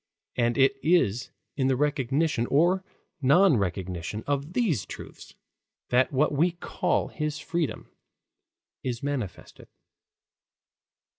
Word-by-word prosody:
And 120 Hz, -1 st, +1 dB
it 135 Hz, 0 st, +4 dB
is 135 Hz, -, +2 dB, 0.3 s
in 130 Hz, -2 st, +1 dB
the 135 Hz, -, +3 dB
recognition 145 Hz, -1 st, +1 dB
or 175 Hz, +6 st, +3 dB, 0.4 s
non 145 Hz, +3 st, +5 dB
recognition 95 Hz, +1 st, -3 dB
of 145 Hz, +3 st, -2 dB
these 185 Hz, -, +1 dB
truths -, -, -10 dB, 0.5 s
that 125 Hz, +1 st, +3 dB
what 145 Hz, +2 st, +2 dB
we 165 Hz, +4 st, +2 dB
call 175 Hz, -, -1 dB
his 150 Hz, -1 st, -3 dB
freedom 165 Hz, 0 st, -3 dB, 0.9 s
is 120 Hz, -1 st, -4 dB
manifested. 130 Hz, -, -5 dB
140 Hz, 105 wpm, -27 LUFS, 120-155 Hz, 0.9 s, non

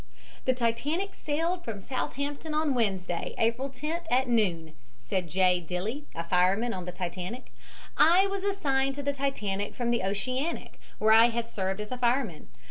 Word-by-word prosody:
"The 255 Hz, -, +3 dB
Titanic 260 Hz, +11 st, 0 dB
sailed 330 Hz, +4 st, -1 dB
from 220 Hz, -3 st, -5 dB
Southampton 280 Hz, +7 st, -3 dB
on 305 Hz, -2 st, +2 dB
Wednesday, 190 Hz, -7 st, -1 dB
April 235 Hz, +4 st, +1 dB
10th, 310 Hz, +6 st, -4 dB
at 255 Hz, +1 st, +3 dB
noon," 180 Hz, -9 st, +1 dB, 0.2 s
said 170 Hz, +9 st, -3 dB
J. 180 Hz, +1 st, +3 dB
Dilley, 205 Hz, -, -3 dB, 0.2 s
fireman 190 Hz, +7 st, +3 dB
on 185 Hz, -2 st, -5 dB
the 180 Hz, -, -4 dB
Titanic. 180 Hz, +6 st, -5 dB, 0.4 s
"I 345 Hz, +6 st, +6 dB
was 395 Hz, -1 st, -2 dB
assigned 275 Hz, -9 st, +1 dB
to 285 Hz, -, -5 dB
the 285 Hz, 0 st, 0 dB
Titanic 210 Hz, -8 st, -2 dB
from 240 Hz, -1 st, 0 dB
the 235 Hz, -, +2 dB
Oceanic, 255 Hz, -, -2 dB, 0.2 s
where 220 Hz, +1 st, +5 dB
I 225 Hz, +1 st, +8 dB
had 235 Hz, 0 st, -2 dB
served 195 Hz, -3 st, -2 dB
as 210 Hz, +2 st, -5 dB
a 250 Hz, -, -3 dB
fireman. 240 Hz, -, 0 dB
235 Hz, 160 wpm, -29 LUFS, 195-280 Hz, 0.4 s, I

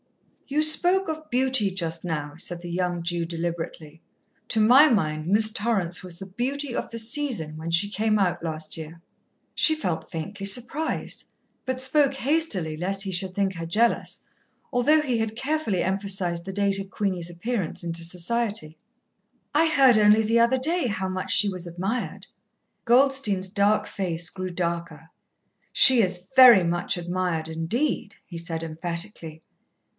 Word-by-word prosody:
"You 295 Hz, +2 st, 0 dB
spoke 355 Hz, +5 st, +3 dB
of 315 Hz, -1 st, -6 dB
beauty 255 Hz, -4 st, +1 dB
just 165 Hz, -3 st, -3 dB
now," 150 Hz, -4 st, -4 dB
said 175 Hz, +1 st, -5 dB
the 175 Hz, -1 st, -7 dB
young 175 Hz, -1 st, -2 dB
Jew 170 Hz, 0 st, -1 dB
deliberately. 165 Hz, -2 st, -6 dB, 0.5 s
"To 220 Hz, -, +1 dB
my 255 Hz, +8 st, +6 dB
mind 155 Hz, -, -1 dB
Miss 215 Hz, +3 st, +4 dB
Torrance 200 Hz, -6 st, -1 dB
was 180 Hz, -2 st, -8 dB
the 195 Hz, -, -8 dB
beauty 250 Hz, +7 st, -3 dB
of -, -, -3 dB
the 230 Hz, -, -7 dB
season, 225 Hz, -, 0 dB
when 160 Hz, +1 st, -6 dB
she 170 Hz, +5 st, +4 dB
came 215 Hz, +1 st, 0 dB
out 180 Hz, -4 st, 0 dB
last 155 Hz, -1 st, -4 dB
year." 160 Hz, +1 st, -9 dB, 0.5 s
She 315 Hz, -, +3 dB
felt 180 Hz, -, -4 dB
faintly 195 Hz, +5 st, -6 dB
surprised, 245 Hz, +10 st, 0 dB, 0.4 s
but 260 Hz, 0 st, -3 dB
spoke 275 Hz, +1 st, +2 dB
hastily 265 Hz, -, 0 dB
lest 195 Hz, +4 st, -1 dB
he 195 Hz, -, -4 dB
should 185 Hz, +1 st, -1 dB
think 195 Hz, -1 st, 0 dB
her 165 Hz, -1 st, -5 dB
jealous, 225 Hz, +8 st, 0 dB, 0.5 s
although 295 Hz, +6 st, +3 dB
he 255 Hz, -6 st, -1 dB
had 225 Hz, 0 st, -3 dB
carefully 265 Hz, -, -1 dB
emphasized 190 Hz, -3 st, -1 dB
the 195 Hz, -, -5 dB
date 200 Hz, 0 st, +1 dB
of 195 Hz, 0 st, -7 dB
Queenie's 185 Hz, -5 st, -2 dB
appearance 185 Hz, +1 st, -3 dB
into 170 Hz, 0 st, -4 dB
society. 180 Hz, -1 st, 0 dB, 0.8 s
"I 320 Hz, +3 st, +3 dB
heard 270 Hz, -7 st, +5 dB
only 210 Hz, +1 st, +5 dB
the 230 Hz, +2 st, +2 dB
other 235 Hz, +3 st, +3 dB
day 320 Hz, +3 st, +1 dB
how 190 Hz, -3 st, -3 dB
much 185 Hz, 0 st, -4 dB
she 210 Hz, -, +5 dB
was 180 Hz, -3 st, -4 dB
admired." 190 Hz, +8 st, -4 dB, 0.6 s
Goldstein's 240 Hz, -6 st, +2 dB
dark 205 Hz, +2 st, +1 dB
face 175 Hz, -5 st, -3 dB
grew 185 Hz, -1 st, -5 dB
darker. 170 Hz, -2 st, -4 dB, 0.6 s
"She 260 Hz, -3 st, +7 dB
is 180 Hz, -3 st, -1 dB
very 250 Hz, -7 st, +9 dB
much 175 Hz, +2 st, -1 dB
admired 175 Hz, -2 st, -2 dB
indeed," 200 Hz, -, -2 dB
he 170 Hz, -2 st, -7 dB
said 165 Hz, -1 st, -5 dB
emphatically. 165 Hz, 0 st, -6 dB
195 Hz, 155 wpm, -24 LUFS, 170-240 Hz, 0.8 s, very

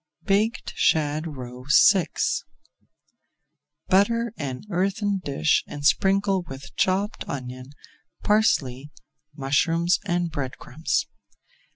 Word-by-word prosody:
BAKED 210 Hz, +5 st, 0 dB
SHAD 155 Hz, +1 st, +1 dB
ROE 125 Hz, 0 st, -9 dB, 0.3 s
VI 185 Hz, -4 st, 0 dB, 1.8 s
Butter 230 Hz, +4 st, +2 dB
an 130 Hz, -4 st, -5 dB
earthen 195 Hz, +2 st, 0 dB
dish 145 Hz, +3 st, +1 dB
and 145 Hz, -1 st, -7 dB
sprinkle 195 Hz, +3 st, +3 dB
with 135 Hz, -5 st, -10 dB
chopped 195 Hz, +3 st, 0 dB
onion, 130 Hz, 0 st, -6 dB, 0.5 s
parsley, 150 Hz, -, +1 dB, 0.5 s
mushrooms, 165 Hz, +5 st, +1 dB
and 175 Hz, -3 st, -1 dB
bread 135 Hz, -4 st, -4 dB
crumbs. 155 Hz, +6 st, -2 dB
165 Hz, 90 wpm, -24 LUFS, 135-195 Hz, 1.8 s, sprinkle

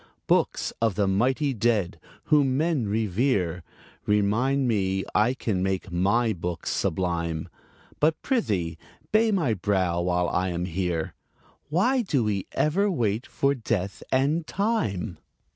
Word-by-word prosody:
Books -, -, +1 dB
of 110 Hz, -4 st, +2 dB
the 100 Hz, -2 st, +1 dB
mighty 130 Hz, +9 st, +1 dB
dead, 105 Hz, -5 st, 0 dB, 0.2 s
whom 140 Hz, -4 st, +3 dB
men 155 Hz, -7 st, +1 dB
revere, 100 Hz, -4 st, 0 dB, 0.5 s
Remind 115 Hz, +7 st, +2 dB
me 95 Hz, -4 st, 0 dB
I 115 Hz, +5 st, +3 dB
can 100 Hz, -8 st, -1 dB
make 95 Hz, 0 st, -2 dB
my 105 Hz, +6 st, +2 dB
books 85 Hz, -1 st, -4 dB
sublime. 85 Hz, -2 st, -1 dB, 0.5 s
But, 155 Hz, +1 st, +2 dB
prithee, 90 Hz, -, -1 dB, 0.3 s
bay 220 Hz, +1 st, +4 dB
my 165 Hz, -, +1 dB
brow 95 Hz, -3 st, 0 dB
while 90 Hz, 0 st, +1 dB
I 90 Hz, +1 st, 0 dB
am 90 Hz, 0 st, -2 dB
here: 90 Hz, -2 st, -2 dB, 0.6 s
Why 240 Hz, -, +2 dB
do 145 Hz, -, 0 dB
we 100 Hz, -3 st, -1 dB
ever 195 Hz, +7 st, +2 dB
wait 115 Hz, -, -1 dB
for 140 Hz, 0 st, +1 dB
Death 105 Hz, -6 st, -2 dB
and 145 Hz, +5 st, +1 dB
Time? 110 Hz, -, -1 dB
105 Hz, 130 wpm, -26 LUFS, 90-140 Hz, 0.6 s, bay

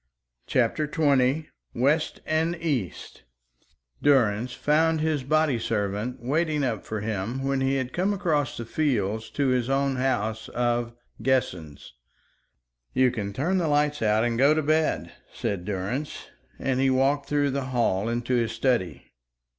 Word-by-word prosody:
CHAPTER 130 Hz, +5 st, +1 dB
XX 145 Hz, -1 st, +2 dB, 0.3 s
WEST 145 Hz, +6 st, +1 dB
AND 160 Hz, +2 st, +1 dB
EAST 140 Hz, -, -3 dB, 0.8 s
Durrance 120 Hz, -4 st, +3 dB
found 160 Hz, +4 st, +2 dB
his 155 Hz, -3 st, 0 dB
body 155 Hz, -2 st, +2 dB
servant 110 Hz, +2 st, -2 dB
waiting 150 Hz, +3 st, 0 dB
up 115 Hz, -6 st, -1 dB
for 110 Hz, -1 st, -4 dB
him 110 Hz, +5 st, -3 dB
when 135 Hz, 0 st, 0 dB
he 135 Hz, +1 st, +1 dB
had 130 Hz, -1 st, -2 dB
come 190 Hz, +3 st, +1 dB
across 155 Hz, -9 st, 0 dB
the 115 Hz, -, -5 dB
fields 110 Hz, -6 st, -1 dB
to 140 Hz, -2 st, 0 dB
his 125 Hz, -1 st, +1 dB
own 135 Hz, -1 st, +1 dB
house 110 Hz, -4 st, -1 dB
of 120 Hz, -1 st, 0 dB, 0.3 s
"Guessens." 90 Hz, -, -1 dB, 1.0 s
"You 130 Hz, -1 st, +4 dB
can 105 Hz, -5 st, -4 dB
turn 160 Hz, -, 0 dB
the 170 Hz, -, 0 dB
lights 150 Hz, 0 st, +1 dB
out 110 Hz, 0 st, +3 dB
and 120 Hz, -1 st, 0 dB
go 140 Hz, +3 st, +5 dB
to 155 Hz, -, 0 dB
bed," 155 Hz, +1 st, +1 dB, 0.2 s
said 95 Hz, -3 st, -3 dB
Durrance, 105 Hz, +10 st, -4 dB, 0.3 s
and 130 Hz, -1 st, -1 dB
he 135 Hz, 0 st, +3 dB
walked 135 Hz, +2 st, +1 dB
through 145 Hz, -1 st, +2 dB
the 135 Hz, 0 st, -2 dB
hall 115 Hz, -5 st, 0 dB
into 120 Hz, +2 st, -2 dB
his 115 Hz, -2 st, +1 dB
study. 115 Hz, -6 st, 0 dB
130 Hz, 145 wpm, -26 LUFS, 115-145 Hz, 1.0 s, go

